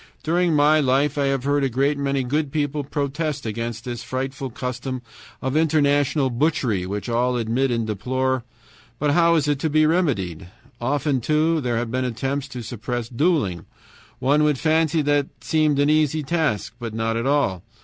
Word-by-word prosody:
"During 170 0 +2
my 150 +1 +5
life 140 +1 +2
I 140 -1 +1
have 135 -2 0
heard 145 0 +1
a 135 - +2
great 135 +4 +1
many 140 -1 -1
good 145 +3 -1
people 145 -1 -1
protest 145 +1 -3
against 115 +1 -4
this 120 -2 -4
frightful 130 +3 -4
custom 125 +1 -5 0.4
of 130 +2 -1
international 145 -3 +2
butchery, 120 - 0
which 100 +3 -4
all 125 +1 +1
admit 120 +4 0
and 115 -2 0
deplore; 130 +4 -1 0.5
but 150 +2 +1
how 170 +2 +4
is 150 -3 +1
it 145 -2 +1
to 160 - 0
be 155 +1 +4
remedied? 110 - 0 0.3
"Often, 140 +1 0
too, 155 +4 +2
there 120 -3 -1
have 115 -1 -2
been 130 +1 0
attempts 135 +3 -2
to 125 -4 -7
suppress 120 +1 -4
dueling; 125 - 0 0.5
one 145 +3 +2
would 150 -2 +2
fancy 160 +1 +2
that 145 -1 +2
seemed 155 -2 +2
an 145 0 +3
easy 155 0 +2
task: 155 - -1
but 115 -3 -5
not 115 0 -1
at 115 +3 -1
all! 140 -11 +1
135 Hz, 175 wpm, -23 LUFS, 120-150 Hz, 0.5 s, my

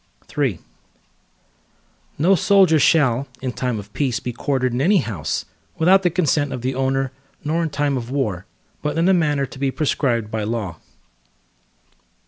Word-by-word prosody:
III - - +1 1.6
No 175 +7 +4
soldier 190 -4 +4
shall, 140 -3 +3
in 130 -1 -3
time 125 -2 -2
of 105 0 -9
peace 130 -5 0
be 125 - -5
quartered 130 0 -1
in 125 - -1
any 195 +7 +4
house, 105 - -2 0.3
without 185 +4 +5
the 180 - +2
consent 155 -4 +1
of 125 - -5
the 130 +1 0
owner, 135 0 0 0.3
nor 160 +3 0
in 165 - -1
time 145 -1 0
of 120 -1 -5
war, 105 -9 -2 0.3
but 150 +1 -2
in 165 +2 +3
a 190 - +5
manner 150 -5 +1
to 135 - -12
be 135 0 +1
prescribed 125 -6 0
by 110 -1 -2
law. 105 -7 -3
135 Hz, 160 wpm, -21 LUFS, 120-160 Hz, 1.6 s, without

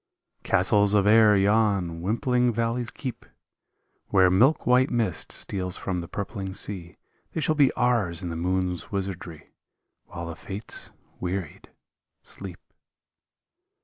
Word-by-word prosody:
Castles 100 +2 +3
of 100 -1 +3
air 110 0 +6
yon 100 -4 +2
wimpling 125 +5 +1
valleys 115 +1 -1
keep 130 -1 -6 0.8
Where 95 -2 +4
milk 130 - +3
white 125 +2 +4
mist 110 -9 -1
steals 90 -2 -2
from 90 -2 -3
the 85 - -6
purpling 95 -1 -5
sea, 90 -5 -4 0.4
They 160 - -2
shall 155 - +2
be 145 -3 +4
ours 105 -9 0
in 90 - -3
the 85 - -4
moon's 90 +1 -2
wizardry, 95 -5 -5 0.5
While 85 -1 -7
the 85 -1 -6
fates, 100 +5 -5 0.3
wearied, 90 -3 -5 0.5
sleep. 95 -3 -8
100 Hz, 125 wpm, -26 LUFS, 90-115 Hz, 0.8 s, air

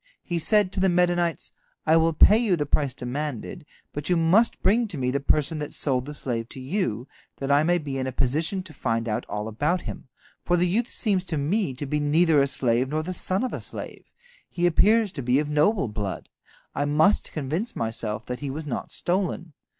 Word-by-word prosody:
He 175 -1 -2
said 205 +3 +3
to 195 - -3
the 190 0 +3
Medanites: 175 -1 +1 0.3
"I 160 - +4
will 165 0 +4
pay 210 +8 +6
you 220 -6 +2
the 150 -3 -2
price 140 -2 0
demanded, 145 - -5 0.3
but 145 +3 -4
you 180 - +3
must 185 +8 +3
bring 225 +3 +3
me 125 -1 0
the 140 - 0
person 150 +2 +1
that 150 - -5
sold 130 -3 0
the 150 +1 -7
slave 120 -4 -3
to - - -9
you, 130 - -2 0.3
that 135 0 -2
I 145 +1 +5
may 175 +3 +2
be 140 -5 -4
in 130 - -2
a - - -2
position 160 +10 0
to 175 -4 -11
find 115 -4 -2
out 105 - -2
all 105 +1 -3
about 150 +11 0
him, - - -8 0.4
for 175 - +2
the 175 - +3
youth 220 +7 0
seems 200 -8 0
to 165 -4 -2
me 155 - 0
to 145 - -5
be 150 +2 -1
neither 155 +1 +3
a 140 - +2
slave 125 -1 +1
nor 155 +2 -1
the 185 +3 -4
son 185 +4 0
of 255 - -2
a - - -4
slave. - - -7 0.4
He 175 -1 -1
appears 210 +5 +4
to 145 - -5
be 125 +1 +2
of 150 0 0
noble 150 - +2
blood. 105 -2 -5 0.4
I 145 - -1
must 155 +7 +2
convince 160 - -3
myself 110 -1 -3
that 125 0 -5
he 145 - -4
was 150 +3 -5
not 140 - -4
stolen." 175 -2 -2
155 Hz, 215 wpm, -25 LUFS, 135-180 Hz, 0.4 s, pay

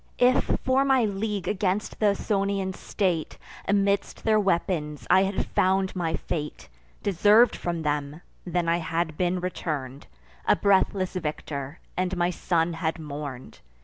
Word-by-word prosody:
If, 250 +1 +3
for 260 +1 +3
my 265 -4 +3
league 205 -2 -2
against 200 +1 -1
th' 215 - +2
Ausonian 195 -2 -1
state, 180 -5 -2 0.3
Amidst 200 0 +1
their 215 -1 +4
weapons 170 -6 -1
I 185 +1 +7
had 195 0 0
found 190 0 +1
my 165 -3 -1
fate, 150 - -5 0.3
(Deserv'd 205 +5 +5
from 170 -2 -3
them,) 145 +1 -2 0.2
then 175 -1 -1
I 170 +1 +3
had 165 -1 -2
been 180 +2 0
return'd 145 -7 -4 0.4
A - - +6
breathless 190 -1 +2
victor, 150 -4 -4 0.2
and 185 0 -1
my 175 0 +2
son 170 -1 0
had 165 0 -2
mourn'd. 145 -4 -7
180 Hz, 140 wpm, -26 LUFS, 160-200 Hz, 0.4 s, I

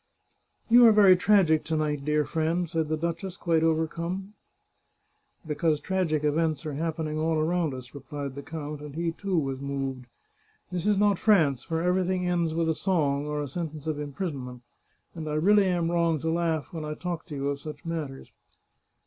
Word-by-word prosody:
" - - -43
You 240 0 +9
are - - +8
very 200 -3 +7
tragic 180 -5 +4
to 160 0 -1
night, 150 -2 -1
dear 150 0 +1
friend," 165 +2 0
said 160 -1 -1
the 155 - 0
duchess, 170 +3 -3
quite 165 -2 +1
overcome. 170 +5 -1 0.5
" - - -41
Because 155 0 0
tragic 170 -5 0
events 155 0 0
are 150 - -3
happening 155 0 -2
all 160 +1 +1
around 160 -2 0
us," 130 -1 -10
replied 140 0 -6
the 140 - -7
count, 150 -1 -6
and 150 -1 -9
he, 165 0 -1
too, 190 +2 -2
was 135 -3 -1
moved. 135 -2 -4 0.3
" - - -38
This 180 +1 -2
is 210 -1 +3
not 205 -2 +3
France, 155 - +3
where 165 0 0
ever):thing 180 0 +1
ends 170 -2 0
with 165 0 +1
a 160 - +2
song 150 -6 0
or 150 0 -2
a - - -4
sentence 155 0 -5
of 155 -2 -2
imprisonment, 140 -5 -5 0.5
and 160 -2 -5
I 150 - -2
really 200 +6 +4
am 175 -2 0
wrong 170 -2 +2
to 160 +1 0
laugh 165 -3 -1
when 160 -2 -4
I 150 0 -4
talk 170 0 -5
to 150 - -6
you 140 0 -1
of 140 0 -3
such 150 +1 -9
matters. 155 -5 -5
160 Hz, 195 wpm, -27 LUFS, 150-175 Hz, 0.5 s, You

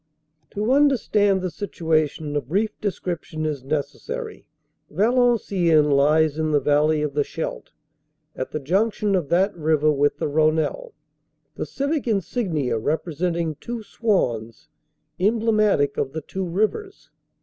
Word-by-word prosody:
To 210 +4 0
understand 225 -8 +3
the 185 - -2
situation 155 -4 -1
a 145 - +1
brief 195 - -1
description 175 -5 -3
is 150 -3 -2
neces 145 +1 -3
sary. 465 -2 -7 0.4
Valenciennes 200 - +2
lies 155 +2 +3
in 155 0 0
the 150 -1 +3
valley 150 +1 +2
of 150 -2 -2
the 145 0 +1
Scheldt, 160 - -6 0.6
at 130 - -4
the 155 - -4
junction 200 +7 0
of 175 -7 0
that 190 +4 +2
river 155 -2 +2
with 145 0 +1
the - - -2
Rhonelle, 155 - 0 0.6
the - - -5
civic 280 0 -2
insignia 175 - -1
representing 165 +4 -1
two 235 -2 -6
swans, 125 - -1 0.5
emblematic 215 -8 +2
of 135 - -2
the 160 - -4
two 190 +5 -5
rivers. 215 - -2
170 Hz, 130 wpm, -23 LUFS, 150-215 Hz, 0.6 s, understand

